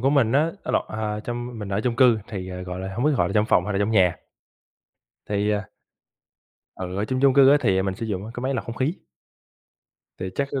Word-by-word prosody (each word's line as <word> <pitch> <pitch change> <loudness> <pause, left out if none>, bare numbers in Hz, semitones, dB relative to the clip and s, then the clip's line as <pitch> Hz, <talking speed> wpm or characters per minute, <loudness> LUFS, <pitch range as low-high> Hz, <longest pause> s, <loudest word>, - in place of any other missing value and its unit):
của 135 +3 +2
mình 130 -6 +3
á 150 +5 +3
á - - -2
lộn, - - +2
à 105 +1 -3
trong 120 0 -5
mình 105 -2 -6
ở 100 +1 -1
chung 115 +1 -1
cư 120 -3 +5
thì, 95 -3 -5
à, 90 0 -6
gọi 90 0 -6
là, 95 0 -5
hông 120 +5 -1
biết 150 - +4
gọi - - +2
là - - -4
trong 105 -1 +2
phòng 90 -5 +3
hay 105 - -2
là 95 - 0
trong 100 +2 +1
nhà. 95 -5 +3 1.1
Thì 105 0 0
à 100 -2 -3 1.1
Ừ, 90 0 -5
ở 100 - 0
chung 130 +4 -2
chung 135 -1 +5
cư 135 -1 +7
á 145 - +7
thì 95 -6 +2
mình 95 -1 -2
sử 115 +3 -5
dụng 100 -2 -3
á, 110 - -8
cái - - -5
máy 135 +1 -1
lọc 130 - -2
không 115 - -6
khí. 135 +7 0 1.2
Thì 95 - -4
chắc 140 0 0
nó 135 - -1
110 Hz, 260 wpm, -24 LUFS, 95-130 Hz, 1.2 s, cư